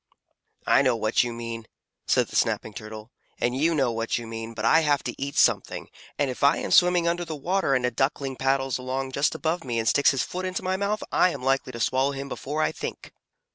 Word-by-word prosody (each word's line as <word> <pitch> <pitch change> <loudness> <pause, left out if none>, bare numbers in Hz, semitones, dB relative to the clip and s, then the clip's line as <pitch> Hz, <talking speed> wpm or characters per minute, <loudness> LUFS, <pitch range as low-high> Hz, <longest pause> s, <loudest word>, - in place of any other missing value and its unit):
"I - - +5
know 130 -3 +2
what 110 +1 +2
you 120 - -3
mean," 115 -1 -6 0.4
said - - +2
the - - -9
Snapping 110 - 0
Turtle, 110 +2 -9 0.3
"and 120 +1 0
you 160 +5 +2
know 135 -5 +2
what 115 0 -1
you 120 - -6
mean, 115 0 -7
but 110 0 -3
I 160 +8 +6
have 145 -3 +1
to - - -6
eat 140 0 -4
something, - - +2 0.3
and 140 -3 +1
if 125 - -7
I 140 +2 +5
am - - -4
swimming 180 -1 +5
under 175 +1 0
the 165 -2 -5
water 175 0 0
and 125 -1 +1
a 125 - 0
Duckling 135 +2 -1
paddles 135 -1 0
along 130 +1 -3
just 140 +3 +1
above 165 +1 -1
me 120 -3 -3
and 115 0 -1
sticks 145 - +4
his 135 - +1
foot 185 +1 -5
into 185 0 -3
my 185 0 0
mouth, 200 +2 -1
I 185 - +4
am 140 -7 -6
likely 135 -1 +1
to 115 - -6
swallow 130 +4 +1
him 140 0 -6
before 150 +4 -3
I - - +1
think." - - -7
135 Hz, 235 wpm, -25 LUFS, 120-155 Hz, 0.4 s, I